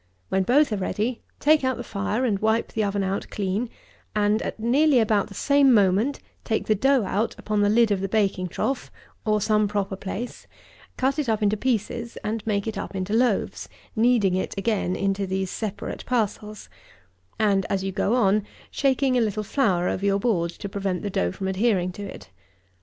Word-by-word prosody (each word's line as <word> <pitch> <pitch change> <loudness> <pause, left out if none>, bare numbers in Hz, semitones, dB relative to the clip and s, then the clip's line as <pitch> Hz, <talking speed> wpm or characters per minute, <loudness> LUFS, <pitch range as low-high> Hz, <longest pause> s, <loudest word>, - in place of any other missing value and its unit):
When 190 - +2
both 255 +5 +3
are - - 0
ready, 215 +5 -2 0.2
take 305 0 +4
out 260 -1 0
the 240 - -5
fire, 210 +4 -2
and 205 -5 +1
wipe 220 +2 +1
the 220 - 0
oven 200 -1 0
out 195 +1 -2
clean, 205 +4 -2 0.5
and, 210 +1 +2
at - - -5
nearly 265 +4 +4
about 215 -3 +2
the 200 - -12
same 280 +2 +4
moment, 210 +5 +3 0.2
take 220 - -1
the 215 - +3
dough 265 +4 +3
out 205 +4 -1
upon 210 -1 -1
the 205 - +3
lid 225 0 +4
of 195 -2 +1
the 195 - -2
baking 195 -3 +1
trough, 265 +9 -2 0.4
or 215 0 +3
some 215 0 +2
proper 200 -1 -2
place, 200 +5 -6 0.5
cut 265 +3 +1
it 280 -6 -1
up 220 -1 +1
into 205 +1 +3
pieces, 235 0 -2
and 215 0 -2
make 200 -2 0
it 220 -3 -3
up - - -6
into 190 +2 -2
loaves, 235 -2 +1 0.3
kneading 225 -4 +3
it 185 +1 -2
again 195 -3 0
into 195 0 -1
these 190 0 -2
separate 210 -2 -5
parcels; 215 -3 -2 0.7
and, 200 -3 +2
as 195 -1 0
you 195 - -2
go 200 +4 +1
on, 210 -3 +3 0.3
shaking 265 -2 +2
a - - +2
little 215 -1 -1
flour 195 -7 +1
over 190 - -2
your 200 0 +3
board, 190 -7 +1
to 190 - -7
prevent 195 -2 -3
the 205 - -3
dough 90 - 0
from 190 - -4
adhering 190 -2 +1
to 190 - -9
it. 200 - -9
210 Hz, 195 wpm, -24 LUFS, 195-235 Hz, 0.7 s, take